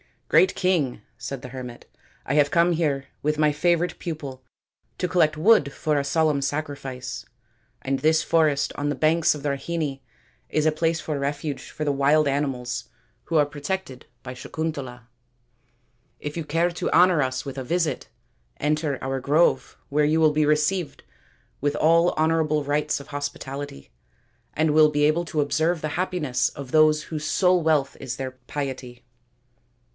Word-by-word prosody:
" - - -44
Great 375 - +5
King," 165 - 0 0.2
said 135 0 -6
the 125 - -8
hermit, 125 -2 -8 0.2
" - - -33
I - - -2
have 145 -1 +4
come 170 +2 +3
here 150 -5 0
with 150 +1 0
my 150 -1 +3
favourite 170 +3 0
pupil 145 -6 -6 0.6
to 180 - -1
collect 160 -3 +2
wood 160 -5 +4
for 150 -2 0
a 140 - -2
solemn 150 -1 +1
sacrifice; 135 -4 -4 0.6
and 135 0 -1
this 155 +1 +3
forest 155 -4 +2
on 145 0 -2
the 145 - -1
banks 155 +3 +3
of 145 - -9
the 145 - 0
Rahini 140 0 -3 0.5
is 155 0 0
a 155 - +4
place 160 +1 0
of - - -12
refuge 145 0 -3
for 155 - -5
the 145 - +1
wild 145 +2 +3
animals 135 -3 -2 0.4
who 165 - -3
are 150 -2 +5
protected 145 -1 -5 0.2
by 130 - -6
Sakuntala. 135 -2 -5 1.2
If 150 0 -6
you 165 - -3
care 165 +4 +1
to 170 - -3
honour 175 -1 +5
us 130 -1 -2
with 135 -1 -6
a 130 - -3
visit, 165 +3 -1 0.5
enter 150 -1 0
our 135 0 -2
grove, 150 +6 +2
where 150 +1 +2
you 155 +2 +2
will 155 -1 +5
be 155 0 +2
received 150 +3 0 0.6
with 145 +1 0
all 165 +2 +4
honourable 155 -1 +1
rites 145 +1 0
of 140 - -11
hospitality, 145 - -6 0.6
and 155 0 +1
will 155 0 +6
be 145 0 0
able 155 +4 +2
to 155 -2 -1
observe 160 +3 0
the 155 - -2
happiness 150 -9 0
of 135 -2 -9
those 155 -1 +4
whose 155 -1 -5
sole 180 +2 +3
wealth 155 -4 +1
is 125 -3 -5
their 130 0 -4
piety." 130 -1 -6
150 Hz, 170 wpm, -24 LUFS, 140-160 Hz, 1.2 s, will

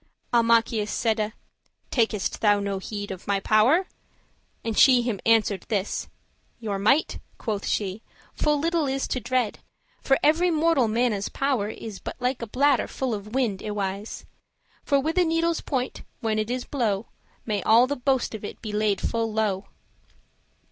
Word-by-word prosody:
Almachius 230 -2 +3
saide; 220 -2 0 0.6
"Takest 220 -5 0
thou 205 -2 +4
no 200 -1 -2
heed 205 +1 -5
Of 185 -1 -8
my 200 -1 +1
power?" 235 - +4 0.8
and 225 -1 -2
she 250 0 +6
him 230 -5 -2
answer'd 215 -4 +3
this; 205 -3 -1 0.5
"Your 205 -4 -3
might," 265 +10 +2 0.2
quoth 210 -4 -3
she, 200 0 -1 0.3
"full 300 -1 +1
little 330 0 0
is 270 0 -1
to 255 - -1
dread; 245 -2 -1 0.4
For 270 - +3
every 330 +4 +4
mortal 320 -6 +3
manne's 220 -3 0
power 260 -7 0
is 220 -2 -7
But - - -6
like 250 0 -1
a 230 - -4
bladder 275 +4 +2
full 260 -3 -3
of 210 +2 -6
wind, 225 -8 0
y 215 - -4
wis;* 200 0 -3
*certainly - - -9 0.6
For 280 -1 +3
with 320 +6 0
a - - +5
needle's 330 0 +1
point, 260 -3 -3 0.2
when 220 -3 0
it 215 +1 -2
is 250 0 -2
blow', 225 -6 -1 0.4
May 210 -3 -1
all 230 +5 +6
the 285 +2 -2
boast 265 -2 0
of 215 - -7
it 205 - -7
be 215 -2 -6
laid 210 -2 +1
full 230 -1 -1
low." 205 -3 -1
225 Hz, 170 wpm, -25 LUFS, 210-265 Hz, 0.8 s, she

